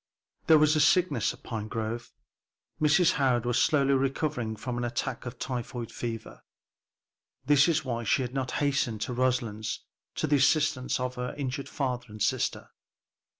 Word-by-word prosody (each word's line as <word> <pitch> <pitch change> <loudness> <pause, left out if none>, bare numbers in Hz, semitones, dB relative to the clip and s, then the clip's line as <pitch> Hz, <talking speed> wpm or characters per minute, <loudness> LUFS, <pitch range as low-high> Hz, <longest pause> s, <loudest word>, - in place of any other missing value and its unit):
There 160 - +8
was 155 0 +4
sickness 155 - +3
at - - -14
Pinegrove. 110 +1 -4 0.7
Mrs. 155 +3 +5
Howard 125 -3 +2
was 120 -1 +2
slowly 140 -3 +3
recovering 135 -3 -1
from 120 +3 -4
an - - -2
attack 120 +1 -3
of 125 0 -7
typhoid 120 -2 -4
fever. 115 -2 -6 1.0
This 145 0 +5
was 155 -3 +1
why 120 -2 -2
she 130 +4 +2
had 125 0 -5
not 130 -2 -2
hastened 135 -6 0
to 125 - -2
Roselands 120 -4 -1 0.3
to - - -1
the 145 - +3
assistance 145 -2 +2
of 125 0 -3
her 125 0 -4
injured 140 -1 -4
father 125 -4 -2
and 105 0 -10
sister. 100 - -1
125 Hz, 150 wpm, -28 LUFS, 120-145 Hz, 1.0 s, There